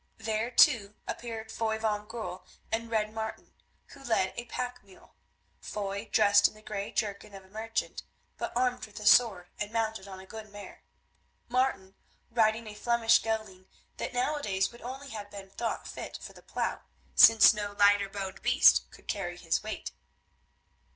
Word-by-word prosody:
There, 220 +1 -2
too, 230 -5 +5
appeared 225 -2 -5
Foy 220 -1 -1
van 210 -1 -2
Goorl 210 -5 -6 0.3
and 230 +1 -2
Red 215 -1 0
Martin, 220 0 -6 0.4
who 275 - -14
led 220 -7 +1
a 240 - -5
pack 250 -1 -5
mule; 195 -2 -19 0.5
Foy 200 +1 -5
dressed 205 -2 +6
in - - -13
the 215 - -17
grey 210 -1 -4
jerkin 205 -1 -3
of 195 -1 -11
a - - -21
merchant, 220 +2 -3 0.3
but - - -4
armed 250 -1 0
with 210 - -11
a 210 - -8
sword 205 -5 +5
and 210 0 -3
mounted 220 -3 -2
on 190 -1 -9
a 190 - -11
good 215 +1 -10
mare; 205 0 -11 0.7
Martin 245 -7 0 0.4
riding 225 -1 +2
a 215 - -8
Flemish 230 +1 +3
gelding 215 -4 -4 0.3
that - - -4
nowadays 245 -7 0
would 235 - -15
only 270 +3 -7
have 210 -4 -7
been 200 -1 -10
thought 230 +2 -3
fit - - -7
for - - -10
the - - -15
plough, - - -3 0.3
since 225 0 +8
no 205 -1 -4
lighter 205 -1 +5
boned 195 -1 -6
beast - - +5
could - - -18
carry 175 -3 -3
his 165 -2 0
weight. 215 0 -5
215 Hz, 170 wpm, -30 LUFS, 200-230 Hz, 0.7 s, since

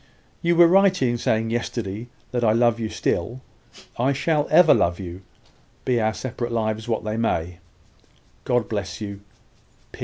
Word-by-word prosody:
You 170 0 +2
were 170 0 +7
right 190 +2 +4
in 120 -2 0
saying 110 0 0
yesterday 115 -2 -3 0.2
that 120 -1 -1
I 110 -2 +4
love 115 0 +2
you 110 -1 -3
still. 115 +9 -2 0.6
I 130 +3 +2
shall 150 +1 0
ever 160 0 +7
love 85 +2 +1
you, 90 -1 -7 0.6
be 125 -2 +1
our 110 0 0
separate 120 -1 -4
lives 110 -1 -2
what 115 -2 -1
they 110 +1 -3
may. 90 -6 -1 0.8
God 120 -2 0
bless 100 -3 -4
you! 100 -2 -6
115 Hz, 155 wpm, -23 LUFS, 110-130 Hz, 0.8 s, were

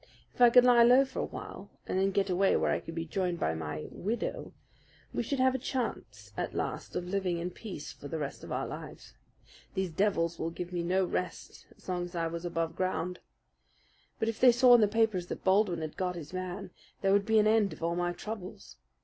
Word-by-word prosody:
If - - -9
I 240 - +9
could 245 +1 +7
lie 245 -1 +7
low 250 +3 +7
for 265 - -7
a - - 0
while - - -8 0.2
and 185 - -1
then 195 +1 +3
get 195 0 +1
away 190 +1 +3
where - - +2
I - - +1
could 165 - -9
be 165 0 -3
joined 180 0 -2
by 80 - 0
my 75 -1 -5
'widow' 220 +6 -3 0.6
we - - 0
should 280 - -2
have 260 0 +3
a 260 - -1
chance 110 - -4
at - - -3
last - - -4
of 175 - -2
living 185 -2 -1
in 175 +2 -3
peace 185 -7 -8
for 145 - -10
the 160 - -4
rest 145 -3 -5
of - - -9
our - - -1
lives. - - -9 0.6
These 190 -2 -1
devils 170 -2 0
would 165 0 -3
give 180 0 -6
me 175 - -1
no 185 +2 +1
rest 180 0 -5
so 185 - -5
long 175 0 -2
as 175 0 -10
I 165 -1 0
was 165 +1 -4
above 165 -1 -2
ground; 180 -1 -2 1.0
but 220 - -1
if 225 -1 -2
they 250 -1 +8
saw 245 +1 +6
in 240 - +7
the 210 - +5
papers 210 -4 +1
that - - -6
Baldwin 190 -3 +3
had 155 -1 -6
got 180 -1 -1
his 165 0 -8
man, 185 +1 -5 0.3
there 195 0 +3
would 200 0 +4
be 220 0 +4
an 215 - +5
end 215 -2 +3
of - - -9
all 170 +1 0
my 175 0 0
troubles. 185 - -8
185 Hz, 230 wpm, -30 LUFS, 170-215 Hz, 1.0 s, I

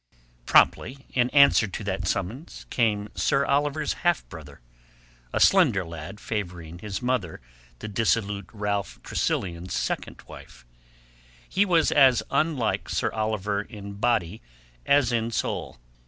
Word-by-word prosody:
Promptly, 135 +3 +3
in 125 -1 +2
answer 140 -6 +5
to 100 - -6
that 95 -1 -3
summons, 115 - -4
came 105 -3 0
Sir 140 0 +1
Oliver's 145 +2 0
half 175 -2 +1
brother—a - - -11
slender 130 - +4
lad 85 +5 -8
favouring 90 -7 -5
his 105 +2 -5
mother 125 -10 -1 0.4
the - - -7
dissolute 105 -2 -1
Ralph 105 -2 -3
Tressilian's 90 0 -2
second - - -3
wife. - - -13 0.8
He 200 - +2
was 170 -4 +3
as 135 -5 +5
unlike 140 -5 0
Sir - - 0
Oliver 105 -2 -1
in 100 -2 -9
body 110 -3 0 0.5
as 140 -3 +4
in 115 -1 0
soul. 110 - -3
105 Hz, 125 wpm, -25 LUFS, 90-130 Hz, 0.8 s, answer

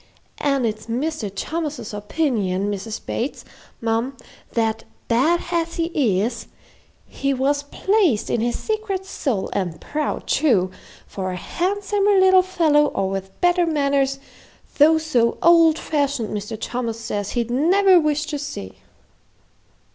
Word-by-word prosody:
An' 275 -3 +1
it's 215 0 -3
Mr. 245 -2 -2
Thomas's 300 -4 -4
opinion, 205 - -1
Mrs. 205 +2 -5
Bates, 250 +5 -3 0.4
mum, 230 +4 -1 0.4
that 225 -2 0 0.2
bad 295 +9 +2
as 335 -1 -1
he 295 - +1
is, 235 - -4 0.6
he 275 0 -2
was 280 +2 +1
pleased 335 - +1
in 230 - +1
his 240 +1 0
secret 425 -4 -3
soul, 260 - -2
an' 175 -5 -2
proud, 300 - -3
too; 220 -11 +2 0.3
for 185 -1 -4
a - - -4
handsomer 400 - 0
little 375 0 +6
fellow, 325 -5 +3
or 195 -7 -2
with 195 0 -6
better 355 -1 +3
manners, 280 -3 +1 0.6
though 315 +2 +7
so 250 -8 +1
old 330 -2 +6
fashioned, 280 -9 -1
Mr. 210 +1 -5
Thomas 235 -2 -3
says 205 -3 -4
he'd 240 -1 -1
never 365 +8 +5
wish 300 -1 0
to 295 -1 -4
see." 100 - -7
275 Hz, 130 wpm, -22 LUFS, 225-325 Hz, 0.6 s, though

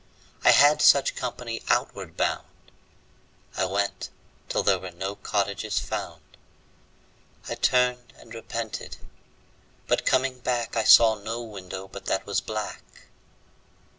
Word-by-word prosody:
I - - +6
had 150 +1 +6
such 140 -2 +5
company 120 -2 -5
outward - - -1
bound. - - -1 1.1
I 95 - 0
went 100 +1 -2 0.4
till - - 0
there 95 -2 +3
were 95 - -7
no 95 +3 -5
cottages 100 +1 -2
found. - - -5 1.2
I - - -3
turned 125 0 +1
and 115 - -14
repented, 115 -3 -6 0.9
but - - +1
coming 130 -1 +1
back 120 -2 -2
I 115 - 0
saw 115 -1 +8
no 110 +3 -5
window 95 -3 -8
but 100 0 -11
that 95 - -1
was 100 -1 -1
black. 110 -1 -5
110 Hz, 125 wpm, -25 LUFS, 100-125 Hz, 1.2 s, saw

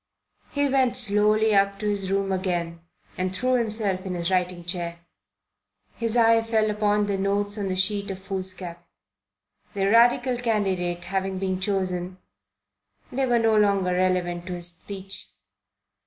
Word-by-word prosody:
He 285 0 +1
went 260 -2 +2
slowly 215 -1 +2
up 200 0 +3
to 210 - -3
his 200 -2 -1
room 195 0 0
again 175 -3 -2 0.4
and 185 0 -1
threw 255 +6 +1
himself 215 -6 0
in 185 -2 -4
his 170 +1 -1
writing 180 -1 0
chair. 175 -1 -3 1.0
His 230 0 -1
eye 230 -1 +5
fell 220 -1 +1
upon 210 0 +1
the 200 -1 -1
notes 205 +1 0
on 200 - -2
the 185 - -1
sheet 200 +2 0
of 190 - -4
foolscap. 185 -2 -5 0.9
The 195 -1 +1
Radical 245 +2 +4
candidate 190 -7 -1
having 190 +1 -2
been 185 -1 -2
chosen, 185 -2 -2 0.9
they 265 +1 0
were 240 -1 +3
no 225 -1 +3
longer 200 -3 +3
relevant 180 -1 0
to 180 - -4
his 175 0 -1
speech. 195 +2 -7
195 Hz, 150 wpm, -25 LUFS, 185-215 Hz, 1.0 s, eye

